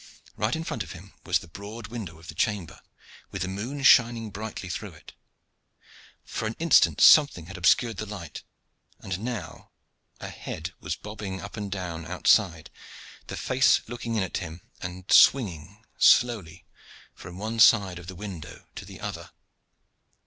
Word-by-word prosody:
Right 105 Hz, +3 st, 0 dB
in 160 Hz, -, -4 dB
front 115 Hz, -, -4 dB
of -, -, -6 dB
him 95 Hz, +3 st, -13 dB
was 90 Hz, -2 st, +3 dB
the 85 Hz, -, -11 dB
broad 105 Hz, +6 st, -9 dB
window 105 Hz, -9 st, -7 dB
of 85 Hz, +1 st, -15 dB
the -, -, -7 dB
chamber, 105 Hz, -6 st, -2 dB, 0.5 s
with -, -, -4 dB
the -, -, -3 dB
moon 115 Hz, +9 st, -5 dB
shining 115 Hz, -4 st, +5 dB
brightly 105 Hz, -1 st, -6 dB
through 90 Hz, -, -6 dB
it. -, -, -15 dB, 1.1 s
For 110 Hz, -, -4 dB
an 110 Hz, -, -4 dB
instant 165 Hz, +1 st, +4 dB
something 145 Hz, -, +6 dB
had 95 Hz, +3 st, -10 dB
obscured 100 Hz, +5 st, +2 dB
the 110 Hz, -, -5 dB
light, 95 Hz, -6 st, -8 dB, 0.6 s
and 95 Hz, -1 st, -5 dB
now 110 Hz, -8 st, -6 dB, 0.5 s
a -, -, -7 dB
head -, -, -7 dB
was -, -, -4 dB
bobbing 105 Hz, -2 st, -7 dB
up 100 Hz, -, -8 dB
and 105 Hz, -3 st, -5 dB
down 85 Hz, -4 st, -5 dB
outside, 90 Hz, -2 st, +2 dB, 0.6 s
the -, -, -6 dB
face 130 Hz, +1 st, +3 dB
looking 115 Hz, 0 st, -5 dB
in 105 Hz, -, +1 dB
at 95 Hz, -, -3 dB
him, 85 Hz, -2 st, -7 dB, 0.2 s
and 90 Hz, 0 st, -7 dB
swinging 100 Hz, -, +4 dB
slowly 105 Hz, -10 st, +3 dB, 0.5 s
from 90 Hz, 0 st, -11 dB
one 110 Hz, +3 st, -4 dB
side 100 Hz, -6 st, +5 dB
of 90 Hz, -, -12 dB
the 95 Hz, -, -8 dB
window 95 Hz, -4 st, -9 dB
to -, -, -9 dB
the -, -, -11 dB
other. -, -, -6 dB
100 Hz, 165 wpm, -26 LUFS, 90-115 Hz, 1.1 s, something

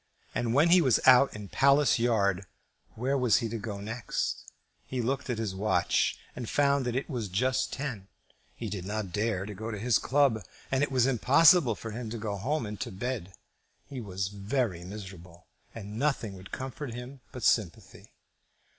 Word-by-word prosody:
And 120 Hz, -1 st, -1 dB
when 155 Hz, +4 st, +5 dB
he 180 Hz, +1 st, +7 dB
was 130 Hz, -7 st, +4 dB
out 130 Hz, 0 st, +6 dB
in 105 Hz, -1 st, -7 dB
Palace 140 Hz, 0 st, +4 dB
Yard, 100 Hz, -5 st, +1 dB, 0.5 s
where 130 Hz, +5 st, 0 dB
was 125 Hz, -4 st, +3 dB
he 115 Hz, -, -1 dB
to 115 Hz, +1 st, -4 dB
go 100 Hz, -1 st, -5 dB
next? 115 Hz, +4 st, -4 dB, 0.4 s
He 130 Hz, -, -3 dB
looked 130 Hz, +3 st, -2 dB
at 120 Hz, -, -1 dB
his 110 Hz, -4 st, -2 dB
watch, 105 Hz, +3 st, +1 dB, 0.2 s
and 120 Hz, -3 st, -5 dB
found 140 Hz, -2 st, +2 dB
that 120 Hz, -, -2 dB
it 130 Hz, -, -1 dB
was 120 Hz, -8 st, -3 dB
just 130 Hz, +7 st, 0 dB
ten. 125 Hz, -9 st, -5 dB, 0.5 s
He 115 Hz, -, -5 dB
did 100 Hz, -3 st, -4 dB
not 105 Hz, -1 st, -4 dB
dare 105 Hz, -2 st, -1 dB
to 105 Hz, -, -6 dB
go 110 Hz, +3 st, -6 dB
to 110 Hz, -, -4 dB
his 115 Hz, +2 st, +2 dB
club, 135 Hz, -5 st, +2 dB, 0.3 s
and 135 Hz, 0 st, +2 dB
it 145 Hz, -, +1 dB
was 130 Hz, -2 st, +3 dB
impossible 135 Hz, -, +5 dB
for 115 Hz, +2 st, -7 dB
him 115 Hz, +1 st, -5 dB
to 115 Hz, -, -5 dB
go 105 Hz, -2 st, -3 dB
home 130 Hz, +7 st, -1 dB
and 105 Hz, -1 st, -6 dB
to -, -, -4 dB
bed. 95 Hz, -2 st, -4 dB, 0.5 s
He 130 Hz, -3 st, -7 dB
was 95 Hz, -2 st, -3 dB
very 100 Hz, -2 st, -2 dB
miserable, 90 Hz, -3 st, -10 dB, 0.3 s
and 105 Hz, 0 st, -7 dB
nothing 135 Hz, -7 st, 0 dB
would 95 Hz, 0 st, -12 dB
comfort 130 Hz, -1 st, -5 dB
him 125 Hz, +2 st, -9 dB
but 125 Hz, -4 st, -8 dB
sympathy. 100 Hz, -8 st, 0 dB
115 Hz, 185 wpm, -29 LUFS, 100-130 Hz, 0.5 s, he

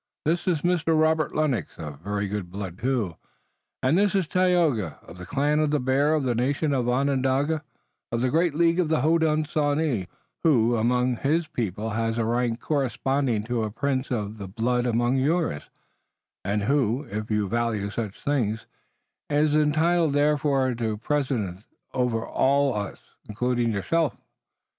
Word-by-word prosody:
This 170 Hz, +4 st, 0 dB
is 165 Hz, -5 st, +1 dB
Mr. 165 Hz, -3 st, +2 dB
Robert 160 Hz, 0 st, +2 dB
Lennox, 150 Hz, -6 st, -1 dB
of 75 Hz, -3 st, -7 dB
very 100 Hz, +3 st, -2 dB
good 100 Hz, -3 st, -4 dB
blood 95 Hz, -1 st, -6 dB
too, 120 Hz, -, -1 dB, 0.7 s
and 130 Hz, +5 st, +3 dB
this 205 Hz, -1 st, +2 dB
is 190 Hz, -5 st, +1 dB
Tayoga, 170 Hz, -, +1 dB
of 85 Hz, +2 st, -13 dB
the 90 Hz, -, -8 dB
Clan 145 Hz, +2 st, +1 dB
of 155 Hz, -1 st, +2 dB
the 150 Hz, 0 st, +1 dB
Bear, 140 Hz, +4 st, +2 dB
of 150 Hz, -, 0 dB
the 125 Hz, -2 st, +1 dB
nation 140 Hz, +5 st, 0 dB
Onondaga, 135 Hz, +4 st, +1 dB, 0.5 s
of 115 Hz, 0 st, -1 dB
the 130 Hz, 0 st, +1 dB
great 165 Hz, -1 st, +2 dB
League 170 Hz, +2 st, +3 dB
of 170 Hz, -4 st, +1 dB
the 155 Hz, -4 st, +2 dB
Hodenosaunee, 155 Hz, -, +1 dB, 0.4 s
who, 120 Hz, -7 st, +4 dB
among 125 Hz, +2 st, +1 dB
his 155 Hz, +7 st, +1 dB
own -, -, -24 dB
people 110 Hz, -1 st, -2 dB
has 115 Hz, +1 st, -1 dB
a 115 Hz, -, +1 dB
rank 120 Hz, 0 st, 0 dB
corresponding 135 Hz, -4 st, 0 dB
to 120 Hz, +1 st, -2 dB
a 110 Hz, -, -1 dB
prince 130 Hz, +4 st, -2 dB
of 110 Hz, -3 st, -3 dB
the 100 Hz, -, -6 dB
blood 120 Hz, +5 st, 0 dB
among 120 Hz, +2 st, +1 dB
yours, 150 Hz, -, 0 dB, 0.7 s
and 100 Hz, +2 st, -1 dB
who, 130 Hz, +1 st, +1 dB
if 110 Hz, -4 st, -5 dB
you 105 Hz, -2 st, +1 dB
value 110 Hz, -2 st, -1 dB
such 105 Hz, -3 st, -4 dB
things, 115 Hz, -7 st, 0 dB, 0.6 s
is 150 Hz, +1 st, +2 dB
entitled 155 Hz, +1 st, +2 dB
therefore 145 Hz, -3 st, +2 dB
to 115 Hz, -2 st, -2 dB
precedence 115 Hz, -8 st, -2 dB, 0.3 s
over 125 Hz, -3 st, 0 dB
all 140 Hz, 0 st, +2 dB
of 100 Hz, -2 st, -3 dB
us, -, -, -21 dB, 0.3 s
including 120 Hz, +2 st, 0 dB
yourself. 155 Hz, -, 0 dB
130 Hz, 160 wpm, -25 LUFS, 110-150 Hz, 0.7 s, who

